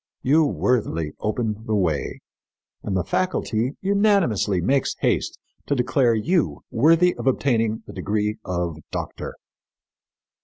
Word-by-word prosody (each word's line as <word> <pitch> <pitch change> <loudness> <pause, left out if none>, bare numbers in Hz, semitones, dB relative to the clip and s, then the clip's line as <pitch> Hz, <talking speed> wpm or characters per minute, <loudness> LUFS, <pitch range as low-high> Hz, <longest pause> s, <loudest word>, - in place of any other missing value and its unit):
You 155 +4 +4
worthily 105 - 0
open 110 0 -2
the 110 - +1
way, 85 -8 -1 0.6
and 95 -2 -2
the 90 - 0
faculty 130 -9 -1
unanimously 195 - +2
makes 135 +10 +1
haste - - 0 0.3
to 145 - +1
declare 125 -1 +2
you 165 - 0
worthy 165 +8 +4
of - - -3
obtaining 115 -5 +1
the - - -10
degree 105 0 -1
of 85 -3 -2
doctor." - - -5
115 Hz, 120 wpm, -23 LUFS, 105-145 Hz, 0.6 s, You